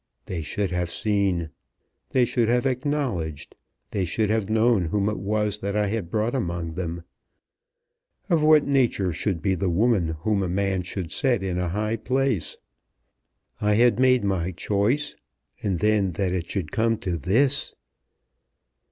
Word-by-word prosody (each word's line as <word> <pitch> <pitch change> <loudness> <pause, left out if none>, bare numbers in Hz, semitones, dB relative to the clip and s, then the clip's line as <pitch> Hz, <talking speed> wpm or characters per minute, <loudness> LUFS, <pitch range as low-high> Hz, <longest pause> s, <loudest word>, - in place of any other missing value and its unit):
They 85 -3 -4
should 95 +5 -2
have 90 -1 -1
seen. 95 -5 0 0.6
They 130 -2 +3
should 120 -1 +1
have 125 +2 +2
acknowledged. 130 - -2 0.4
They 100 - -1
should 105 +5 0
have 110 -2 0
known 110 -3 +3
whom 100 +5 0
it 105 - -1
was 105 0 -1
that 100 0 -3
I 105 -1 +1
had 105 -5 -3
brought 110 +3 0
among 85 -9 -2
them; 85 -1 -4 1.2
of 165 -3 +2
what 155 -1 +5
nature 120 -10 +1
should 85 -1 -2
be 95 - +2
the 95 +1 -1
woman 90 -3 +2
whom 105 +2 +1
a 95 - -1
man 95 0 0
should 90 -1 -5
set 125 -8 +1
in 90 -2 -2
a 90 -1 -1
high 105 +5 -1
place. 130 -4 -1 1.0
I 105 0 +3
had 120 0 +4
made 130 -2 +4
my 95 -3 0
choice; 105 - 0 0.5
and 95 -4 0
then 105 -1 +2
that 95 +1 -1
it 90 -2 -3
should 90 -7 -3
come 115 0 +1
to 90 -4 -3
this!" 130 - +1
100 Hz, 160 wpm, -25 LUFS, 90-115 Hz, 1.2 s, what